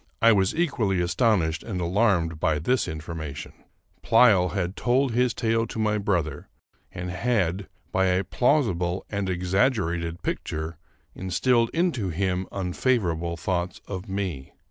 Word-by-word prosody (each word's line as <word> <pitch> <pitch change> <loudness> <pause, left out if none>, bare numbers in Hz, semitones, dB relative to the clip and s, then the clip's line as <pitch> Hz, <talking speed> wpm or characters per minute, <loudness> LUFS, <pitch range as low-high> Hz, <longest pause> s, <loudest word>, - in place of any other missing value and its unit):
I 115 - +6
was 95 -3 +2
equally 125 - +1
astonished 90 -3 +1
and 100 -6 -5
alarmed 85 -3 +1
by 75 -1 +1
this 125 - 0
informa 80 -2 -6
tion. - - -8 0.5
Pleyel 100 -7 +5
had 95 -1 -2
told 130 +2 +1
his 125 0 +1
tale 115 -1 +1
to - - -8
my 105 -1 +1
brother, 85 -8 -1 0.4
and 90 0 -5
had, 95 -3 0 0.2
'by 95 0 +2
a 90 +1 +2
plausible 95 - +1
and 100 -2 -2
exaggerated 90 -2 0
picture, 80 +1 -4 0.3
instilled 115 +6 +1
into 165 - 0
him 90 +1 -1
unfavorable 90 -4 -1
thoughts 90 +1 -2
of 95 +1 -6
me. 95 -9 -4
95 Hz, 135 wpm, -25 LUFS, 85-115 Hz, 0.5 s, I